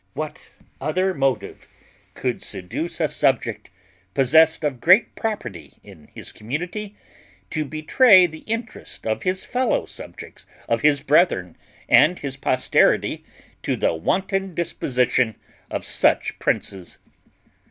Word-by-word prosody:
What - - -6 0.3
other 185 +7 0
motive 135 -6 -2 0.5
could - - -3
seduce 160 - -4
a 160 - +2
subject, 125 -8 0 0.5
possessed 160 +5 +4
of 135 -5 -2
great 185 +7 +5
property 220 -2 -5
in 95 -7 -15
his - - -9
community, 180 - -5 0.6
to 155 -1 -2
betray 180 - +5
the 160 -2 -7
interest 225 0 -6
of 110 -1 -1
his 185 0 -1
fellow 250 -1 0
subjects, - - -11 0.2
of 115 - 0
his 145 -2 +3
brethren, 135 - +2 0.3
and 175 +3 +5
his 140 -2 -4
posterity, 130 -1 +1 0.4
to - - -1
the - - +1
wanton 190 - -1
disposition 125 - 0 0.3
of - - -4
such - - +2
princes? 95 -3 -3
155 Hz, 120 wpm, -22 LUFS, 125-185 Hz, 0.6 s, great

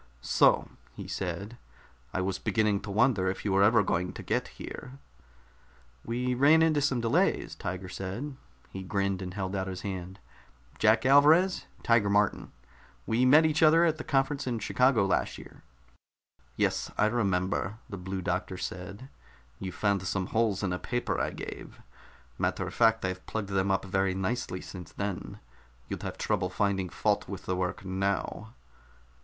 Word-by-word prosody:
"So!" - - +3 0.3
he - - -7
said. 100 +5 -4 0.5
"I 95 - -1
was 95 0 -2
beginning 105 -3 +1
to 100 - -8
wonder 105 -2 +2
if 95 - -5
you 100 - +1
were 95 0 +3
ever 110 +2 +5
going 90 -1 -1
to - - -8
get - - -1
here." 125 - -9 1.1
"We 125 +2 -1
ran 145 +6 +5
into 155 -2 +3
some 135 -4 +1
delays," 115 -1 +1
Tiger 90 +1 -5
said. 95 +10 -5 0.4
He 95 - -6
grinned 100 0 -1
and 90 0 -6
held 95 -1 -3
out 95 0 -2
his 95 -1 -5
hand. 95 -1 -5 0.6
"Jack 110 +2 +4
Alvarez? 155 +7 +5 0.2
Tiger 115 -3 +3
Martin. 100 0 +1 0.5
We 120 +3 +2
met 150 +5 +7
each 155 +1 +1
other 165 +2 +6
at 160 -2 +1
that - - -7
conference 135 0 0
in 120 -2 -1
Chicago 120 0 +3
last 95 - 0
year." - - -13 0.9
"Yes, - - 0
I - - +4
remember," 100 -2 0
the 100 -5 -7
Blue 95 +1 -5
Doctor 90 +1 -2
said. 95 +8 -6 0.5
"You 95 - -4
found 100 -1 0
some 95 0 -2
holes 110 -4 +1
in 90 -2 0
a 90 - -3
paper 120 +1 -2
I - - 0
gave. - - -8 0.6
Matter - - 0
of - - -6
fact, 115 -3 +3
I've 95 0 -3
plugged 105 -3 -3
them 95 0 +1
up 95 0 +1
very 95 -1 0
nicely 95 -1 -2
since 90 -4 -9
then. 100 -2 -4 0.5
You'd - - -4
have - - -5
trouble 100 -4 0
finding 95 -1 0
fault - - 0
with - - -7
the 90 - -1
work 90 +1 -3
now." 100 +4 -2
100 Hz, 165 wpm, -29 LUFS, 95-120 Hz, 1.1 s, met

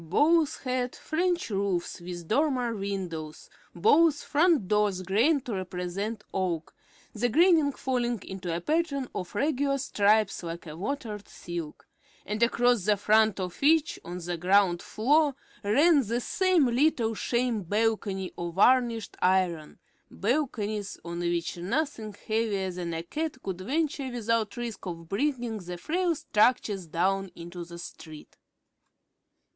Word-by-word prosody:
Both 310 - +3
had 255 -1 -1
French 345 -4 -1
roofs 195 -3 -1
with 175 -1 -7
dormer 250 - +1
windows; 185 -6 -5 0.2
both 335 -9 +4
front 305 - +3
doors 205 -2 +1
"grained" 245 - +2
to 240 - -3
represent 190 +3 -4
oak, 175 -4 -2 0.4
the 240 +3 0
graining 320 +1 +4
falling 245 -4 -1
into 190 -2 -5
a 170 +1 -2
pattern 290 - 0
of 180 +1 -6
regular 280 +2 +1
stripes 215 -5 +2
like 170 0 -6
a 155 -1 -8
watered 210 - -4
silk; 170 -3 -7 0.4
and 210 +2 -3
across 240 -3 +3
the 210 -1 +3
front 215 0 +3
of 180 -2 -5
each, 315 +2 +3
on 175 +1 -6
the 175 0 -4
ground 180 0 +3
floor, 285 +5 +2 0.3
ran 285 +9 +5
the 235 +2 0
same 370 +3 +2
little 245 -2 +2
sham 235 0 0
balcony 205 -1 -1
of 170 -1 -4
varnished 235 +1 +3
iron, 180 -4 +1 0.3
balconies 215 -4 -2
on 170 0 -5
which 170 0 -1
nothing 220 - -2
heavier 215 -4 0
than 175 -2 -4
a 165 - -3
cat 305 - -3
could 185 -2 -4
venture 280 +4 -1
without 230 -3 -1
risk 240 -2 -5
of 165 -2 -6
bringing 240 - -1
the 180 -1 -7
frail 340 - 0
structures 210 - +1
down 190 +4 0
into 175 +1 -8
the 170 0 -10
street. 155 -2 -11
215 Hz, 135 wpm, -28 LUFS, 180-265 Hz, 0.4 s, ran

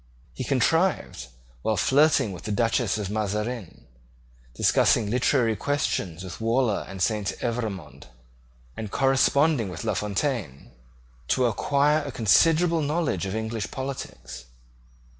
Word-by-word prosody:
He - - -5
contrived, 145 - 0 0.3
while 110 +6 0
flirting 140 - +3
with 90 - -9
the 105 - -3
Duchess 115 0 +1
of 100 -2 -4
Mazarin, 105 0 -3 0.7
discussing 110 - +3
literary 120 -2 +2
questions 95 - -2
with 90 +3 -8
Waller 115 -1 +1
and 95 -2 -3
Saint 105 -1 0
Evremond, 110 - -4 0.7
and 110 -2 -5
corresponding 135 -2 +2
with 90 - -7
La 110 -2 0
Fontaine, 100 - -3 0.6
to 130 - +2
acquire 140 +6 +2
a 140 - -5
considerable 165 - +3
knowledge 145 - -1
of 95 - -4
English 110 -1 -3
politics. 130 - -7
115 Hz, 120 wpm, -25 LUFS, 100-140 Hz, 0.7 s, flirting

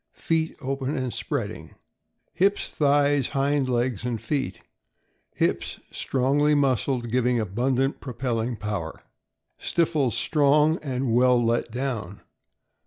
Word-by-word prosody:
Feet 160 -1 0
open 135 +1 -2
and 130 -2 -2
spreading. - - -4 0.6
Hips, 195 +4 +2
thighs, 145 -2 +2
hind 140 -1 0
legs, 120 -3 0
and 120 -2 -2
feet. 135 -10 -3 0.4
— - - -46
Hips - - 0
strongly 140 +3 +1
mus 135 -4 +2
cled, 120 -4 -2
giving 125 0 +2
abundant 125 +6 0
propelling 120 -2 -2
power. 105 -7 -5 0.6
Stifles 155 -8 +1
strong 150 +1 +3
and 130 -4 -1
well 125 +1 +5
let 115 0 +1
down. 115 -6 -4
130 Hz, 115 wpm, -25 LUFS, 120-145 Hz, 0.6 s, well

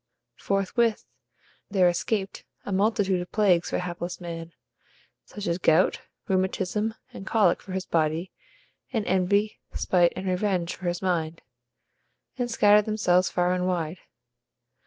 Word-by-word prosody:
Forthwith 205 +3 0 0.6
there 190 -3 +4
escaped 190 +3 -1 0.2
a - - -4
multitude 195 -2 +1
of 180 - -8
plagues 185 -5 +3
for - - -1
hapless 175 0 -5
man, 170 -1 -7 0.7
such 205 -1 -8
as 170 -1 -1
gout, 170 +1 +3 0.3
rheumatism, 190 +3 0 0.2
and 195 - -9
colic 220 -2 +3
for 190 - -9
his 190 0 -3
body, 165 +2 0 0.6
and 225 -4 -1
envy, 200 +3 +1 0.2
spite, 175 -2 +2
and 190 - -5
revenge 185 -2 0
for 185 - -6
his 175 +2 -2
mind, 165 -3 -1 0.9
and 245 -2 -2
scattered 210 -2 +5
themselves 185 -4 +2
far 180 0 +1
and 180 0 -1
wide. 175 -1 -2
185 Hz, 135 wpm, -26 LUFS, 175-205 Hz, 0.9 s, scattered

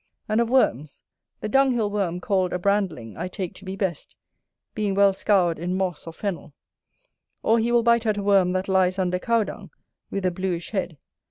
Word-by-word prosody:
And 215 +2 +2
of 235 - 0
worms; 155 - +1 0.4
the - - -2
dunghill 245 -4 +2
worm 185 -4 -1
called 185 -2 0
a - - +1
brandling 180 - -1
I 175 - -3
take 185 -1 -5
to 195 - -13
be 190 +1 -5
best, 190 -6 -3 0.6
being 205 -2 -1
well 200 0 +5
scoured 185 -4 +2
in 180 +2 -2
moss 185 -4 -3
or 165 - -6
fennel; 175 -6 -5 0.9
or 230 +1 +3
he 230 +2 0
will 240 -1 +4
bite 235 -1 +3
at 215 -1 +1
a 200 - -2
worm 195 -3 +4
that 185 +1 -1
lies 190 -1 +2
under 180 -1 0
cow 230 +2 +2
dung, - - -8 0.4
with 195 -1 -3
a 185 - +2
bluish 175 -1 -3
head. 185 -6 -3
190 Hz, 195 wpm, -24 LUFS, 180-210 Hz, 0.9 s, well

